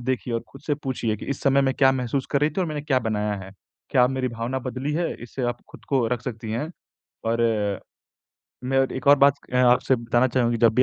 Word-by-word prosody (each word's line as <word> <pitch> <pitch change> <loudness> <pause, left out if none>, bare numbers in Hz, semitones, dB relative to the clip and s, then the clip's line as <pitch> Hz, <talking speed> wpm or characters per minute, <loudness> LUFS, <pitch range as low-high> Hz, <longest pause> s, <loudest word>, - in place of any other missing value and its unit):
देखिए 125 -1 -2
और 115 - 0
खुद 135 - -13
से 145 - +2
पूछिए 120 -4 -1
कि - - -9
इस - - -14
समय 140 0 +4
मैं 135 0 +1
क्या 135 -2 +5
महसूस 130 +1 -2
कर 140 - +2
रही 150 +1 +3
थी 190 - -3
और 180 - +1
मैंने 150 -2 -3
क्या 140 -4 +2
बनाया 105 -2 -1
है। 95 - -11 0.4
क्या 125 -4 +5
अब 125 - +1
मेरी 130 -1 -1
भावना 115 +3 -3
बदली 130 +3 -4
है? 170 +2 -1
इससे 125 +2 -6
आप 120 0 -1
खुद - - -14
को 130 -4 +2
रख 125 -2 -1
सकती 115 -3 -5
हैं 135 +9 -2 0.6
और 115 0 +1 1.2
मैं 135 +1 +1
और 135 0 +2
एक 130 - -6
और 145 - +9
बात 140 0 +6 0.2
अ, 125 - +1
आपसे 125 +1 +4
बताना 120 +2 +2
चाहूँ 120 -1 +1
कि 115 - -1
जब 115 -1 +4
भी 130 - +5
130 Hz, 250 wpm, -24 LUFS, 120-135 Hz, 1.2 s, और